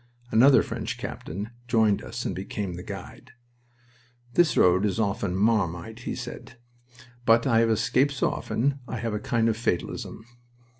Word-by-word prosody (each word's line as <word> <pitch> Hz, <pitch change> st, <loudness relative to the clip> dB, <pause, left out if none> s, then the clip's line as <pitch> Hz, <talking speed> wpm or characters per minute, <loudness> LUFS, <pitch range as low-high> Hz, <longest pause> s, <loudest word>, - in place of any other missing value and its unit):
Another 130 Hz, +5 st, +6 dB
French -, -, -4 dB
captain 100 Hz, +7 st, -6 dB, 0.2 s
joined 110 Hz, -4 st, +3 dB
us -, -, -6 dB
and -, -, -1 dB
became 95 Hz, 0 st, -4 dB
the 90 Hz, -, -7 dB
guide. 100 Hz, +7 st, -9 dB, 1.0 s
"This 175 Hz, +1 st, +3 dB
road 90 Hz, +2 st, +5 dB
is 100 Hz, -2 st, 0 dB
often 100 Hz, -3 st, -1 dB
'Marmite,'" 110 Hz, +2 st, 0 dB
he -, -, -3 dB
said, 125 Hz, -, -8 dB, 0.7 s
"but 115 Hz, 0 st, +4 dB
I 115 Hz, -4 st, +4 dB
have 115 Hz, 0 st, +3 dB
escaped 130 Hz, +6 st, +2 dB
so 130 Hz, -, +1 dB
often 140 Hz, +4 st, -1 dB
I 125 Hz, -, -4 dB
have 115 Hz, -1 st, -3 dB
a 105 Hz, -, -1 dB
kind 115 Hz, +1 st, +1 dB
of 115 Hz, -, +2 dB
fatalism." 110 Hz, 0 st, -3 dB
110 Hz, 155 wpm, -26 LUFS, 100-120 Hz, 1.0 s, Another